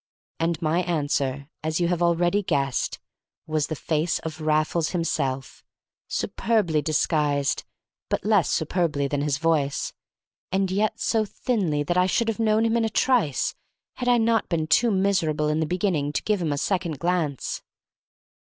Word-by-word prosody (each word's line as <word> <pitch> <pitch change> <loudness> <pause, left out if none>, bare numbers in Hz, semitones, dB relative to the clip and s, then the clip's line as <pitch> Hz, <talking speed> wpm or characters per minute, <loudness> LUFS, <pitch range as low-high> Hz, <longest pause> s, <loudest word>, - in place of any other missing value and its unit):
And 165 -1 0
my 160 +2 +2
answer, 145 -5 -1 0.2
as 155 +1 -1
you 175 - +2
have 175 -1 0
already 175 +3 +2
guessed, 140 -8 -1 0.5
was 155 -1 0
the 155 - -3
face 155 +3 0
of 160 0 -7
Raffles 155 +1 +1
himself, 135 -5 -2 0.4
superbly 200 -10 0
disguised 145 -2 +1 0.4
(but - - -1
less 205 -6 +3
superbly 160 -3 0
than 140 0 -1
his 145 -1 0
voice), 150 -3 0 0.6
and 190 0 +1
yet 210 +3 0
so 225 -2 +1
thinly 195 -9 -1
that 175 +5 -1
I 180 - +4
should 225 +4 +1
have 225 - -2
known 220 0 +3
him 230 +1 +2
in 230 - +1
a - - 0
trice 220 - +1 0.4
had 250 - -3
I 245 -1 +5
not 225 -1 +2
been 165 -3 0
too 235 +9 +3
miserable 185 -7 +1
in 150 +1 +1
the 160 - 0
beginning 175 -5 0
to - - -1
give 210 -3 0
him 160 -3 0
a 145 - -1
second 175 -2 -1
glance. 170 -5 -1
165 Hz, 160 wpm, -25 LUFS, 150-195 Hz, 0.6 s, I